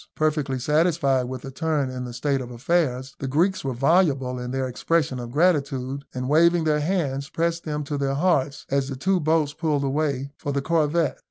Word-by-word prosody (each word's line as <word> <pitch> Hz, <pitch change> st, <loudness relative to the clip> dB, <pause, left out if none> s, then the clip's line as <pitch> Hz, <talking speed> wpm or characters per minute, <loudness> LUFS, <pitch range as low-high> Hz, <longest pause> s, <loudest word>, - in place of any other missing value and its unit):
Perfectly 150 Hz, -4 st, 0 dB
satisfied 150 Hz, -2 st, +2 dB
with 130 Hz, 0 st, -6 dB
this 135 Hz, -, -7 dB
turn 150 Hz, -3 st, -1 dB
in 125 Hz, 0 st, -5 dB
the 125 Hz, -, -6 dB
state 135 Hz, +2 st, 0 dB
of 125 Hz, -, -7 dB
affairs, 130 Hz, 0 st, 0 dB
the 135 Hz, -, -3 dB
Greeks 170 Hz, +8 st, +1 dB
were 135 Hz, -2 st, -2 dB
voluble 135 Hz, -3 st, +2 dB
in 125 Hz, 0 st, -5 dB
their 130 Hz, 0 st, -1 dB
expression 130 Hz, +1 st, 0 dB
of 120 Hz, -1 st, -6 dB
gratitude, 140 Hz, -4 st, +1 dB
and 125 Hz, 0 st, -3 dB
waving 170 Hz, +3 st, +4 dB
their 155 Hz, -1 st, +2 dB
hands, 145 Hz, -5 st, -1 dB
pressed 170 Hz, 0 st, -1 dB
them 150 Hz, -1 st, -2 dB
to 145 Hz, 0 st, -3 dB
their 135 Hz, -1 st, 0 dB
hearts, 145 Hz, -4 st, +1 dB
as 140 Hz, 0 st, +1 dB
the 135 Hz, -, -4 dB
two 185 Hz, +8 st, +1 dB
boats 155 Hz, -2 st, +1 dB
pulled 150 Hz, -3 st, 0 dB
away 140 Hz, -1 st, -1 dB
for 145 Hz, -, -4 dB
the 140 Hz, -, 0 dB
corvette. 165 Hz, 0 st, +1 dB
140 Hz, 195 wpm, -24 LUFS, 130-160 Hz, -, waving